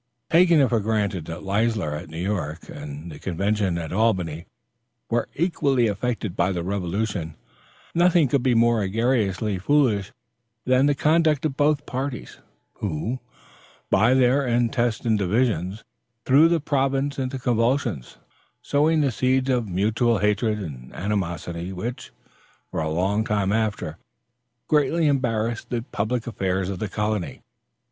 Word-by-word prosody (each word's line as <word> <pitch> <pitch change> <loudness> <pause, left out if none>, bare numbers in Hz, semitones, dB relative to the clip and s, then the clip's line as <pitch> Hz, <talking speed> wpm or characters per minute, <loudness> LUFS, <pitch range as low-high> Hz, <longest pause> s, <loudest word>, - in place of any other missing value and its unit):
Taking 170 -1 +6
it 135 - +4
for 115 - +2
granted 105 -5 -1
that 85 +1 -7
Leisler 100 -5 0
at 80 +2 -6
New 80 - -8
York 85 -6 -3
and 75 +3 -8
the 75 - -10
convention 95 0 -1
at 85 -1 -5
Albany 90 -7 0 0.6
were 120 0 0
equally 140 -7 +1
affected 110 -2 -2
by 90 +2 +1
the 90 -2 -2
revolution, 95 -2 -2 0.6
nothing 175 -3 +4
could 135 +1 +1
be 125 -1 +2
more 115 -1 +3
egregiously 105 -2 0
foolish 110 -4 +2 0.5
than 130 +2 +4
the 145 - +2
conduct 155 0 +2
of 145 -4 -1
both 145 0 +2
parties, 130 0 -5 0.4
who, 105 +7 -3 0.7
by 115 +6 +4
their 130 +2 +3
intestine 120 -2 +1
divisions, 100 -1 0 0.4
threw 145 +5 +6
the 170 0 +2
province 140 -1 0
into 130 0 -2
convulsions, 120 - 0 0.5
sowing 155 +2 +2
the 140 -3 +2
seeds 130 +3 +1
of 120 -3 0
mutual 110 +5 +1
hatred 105 +2 +1
and 70 -11 -8
animosity, 90 -3 -3
which, 115 +7 -5 0.6
for - - -3
a 80 - -1
long 95 +7 +1
time 105 -3 0
after, 105 -8 -2 0.7
greatly 155 +2 +2
embarrassed 120 -5 0
the 120 -2 -2
public 110 +3 -1
affairs 95 -4 -1
of 95 -2 -4
the 105 - -3
colony. 105 -2 -2
110 Hz, 140 wpm, -24 LUFS, 95-130 Hz, 0.7 s, Taking